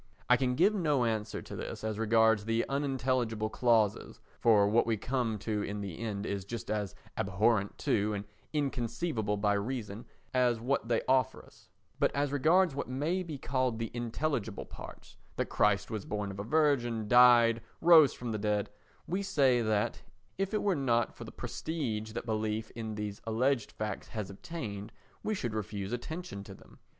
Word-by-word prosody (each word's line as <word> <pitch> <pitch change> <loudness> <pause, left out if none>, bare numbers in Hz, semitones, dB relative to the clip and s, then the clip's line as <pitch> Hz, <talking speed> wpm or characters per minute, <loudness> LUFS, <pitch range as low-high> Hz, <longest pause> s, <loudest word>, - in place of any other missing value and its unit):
I 125 - +6
can 125 -1 0
give 195 +9 +4
no 150 - +2
answer 110 -2 -2
to - - -8
this - - -6
as 110 -1 -2
regards 110 -1 +4
the 115 +1 0
unintelligible 130 -6 0
clauses, 110 -4 +1 0.2
for 105 -3 +5
what 115 +3 +3
we 115 -1 +1
come 120 -1 -1
to 105 +1 -2
in 105 0 -4
the 95 -5 -6
end 105 -3 -3
is 100 -1 -2
just 115 +4 -6
as 105 -3 -2 0.2
abhorrent 100 +1 +1
to 105 0 +2
and 100 0 -4 0.3
inconceivable 125 -5 -1
by 105 0 +2
reason 105 0 -3 0.3
as 125 -2 +3
what 120 -1 -1
they 115 -1 +1
offer 130 -1 +2
us; - - -21 0.3
but - - +3
as 140 0 0
regards 160 +4 +4
what 140 - -3
may 150 +8 0
be 160 -5 -5
called 130 -3 0
the 115 -1 -4
intelligible 120 -2 -2
parts—that - - -8
Christ 105 0 +2
was 110 -3 -3
born 105 -1 -3
of 95 - -8
a - - -2
Virgin, 120 -5 +1
died, 120 -1 +6 0.2
rose 160 -4 +7
from 120 -2 -5
the 110 - -2
dead—we 105 - -3
say 140 -11 +3
that, 110 -2 0 0.4
if 195 0 0
it 215 - 0
were 200 - +3
not 120 -6 +1
for - - -9
the - - -9
prestige 110 -10 -4
that - - -4
belief 110 0 -2
in 110 -2 -5
these 105 -1 -5
alleged 120 +2 +1
facts 105 -2 -4
has 105 -4 -5
obtained, 105 - -6 0.3
we 215 - -1
should 120 - -3
refuse 105 -1 -4
attention 155 - -5
to - - -10
them. - - -18
115 Hz, 175 wpm, -31 LUFS, 105-135 Hz, 0.4 s, rose